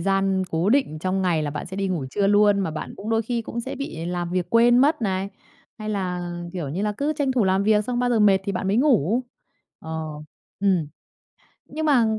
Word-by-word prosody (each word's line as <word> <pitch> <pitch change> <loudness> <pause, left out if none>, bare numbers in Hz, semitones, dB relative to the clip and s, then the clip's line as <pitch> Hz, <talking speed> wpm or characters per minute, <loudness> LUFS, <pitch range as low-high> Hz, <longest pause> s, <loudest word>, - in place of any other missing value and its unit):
gian 195 +1 +1
cố 165 +4 0
định 255 - +1
trong 185 +3 -1
ngày 170 -4 +1
là 145 - -2
bạn 150 0 -5
sẽ 190 +2 -7
đi 195 -1 -1
ngủ 170 -7 -2
trưa 200 -1 +1
luôn, 205 0 +4
mà 185 - -1
bạn 155 - -6
cũng 215 +3 -6
đôi 225 0 +2
khi 235 +1 -2
cũng 235 +2 -5
sẽ 265 - -5
bị 170 - -5
làm 175 -1 -3
việc 180 -1 0
quên 240 +1 +5
mất 290 -1 +3
này, 190 -1 -1 0.5
hay 215 0 -6
là, 180 -4 -2 0.2
kiểu 170 -7 -4
như 180 +8 -3
là, 210 0 0
cứ 295 +2 0
tranh 275 -3 +1
thủ 240 -5 +2
làm 190 +1 +2
việc 210 0 +3
xong 245 0 -2
bao 245 0 +1
giờ 225 -2 +2
mệt 200 -2 +5
thì 200 - -2
bạn 190 +1 -2
mới 205 - +2
ngủ. 245 - +3 0.6
Ờ, 160 - -9 0.7
ừm. 185 -6 +2 0.8
Nhưng 315 +1 -4
mà 260 -6 +4
200 Hz, 230 wpm, -23 LUFS, 180-235 Hz, 0.8 s, quên